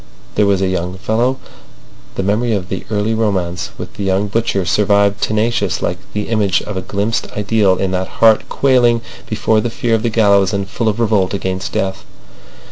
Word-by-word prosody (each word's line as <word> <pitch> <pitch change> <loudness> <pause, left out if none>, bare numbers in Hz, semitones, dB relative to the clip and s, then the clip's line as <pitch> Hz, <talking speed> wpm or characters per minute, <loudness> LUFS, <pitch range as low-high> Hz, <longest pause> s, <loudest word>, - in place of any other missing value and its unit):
There 105 - +2
was 95 -1 +2
a - - +2
young 90 0 -2
fellow—" 120 +6 0 0.8
The 95 - -2
memory 110 +4 +1
of 95 -2 -3
the 95 - -4
early 105 +1 0
romance 95 -5 -1
with - - -8
the 100 - -3
young 95 +1 0
butcher 105 -3 0
survived, 100 +2 +2
tenacious, 110 +2 0
like - - -1
the 105 0 -3
image 105 -5 +2
of 105 - -6
a 95 - -2
glimpsed 100 +4 -2
ideal 105 -2 +2
in 95 -1 -1
that 95 0 -1
heart 110 -1 +4
quailing 120 -4 +3 0.3
before 110 -1 +1
the 120 - -2
fear 115 0 -1
of 110 - +2
the 115 - 0
gallows 100 -3 +3
and 100 -1 -2
full 110 +3 -1
of 110 +2 -3
revolt 105 -4 +1
against 95 -1 -3
death. 95 0 -2
105 Hz, 190 wpm, -17 LUFS, 95-110 Hz, 0.8 s, heart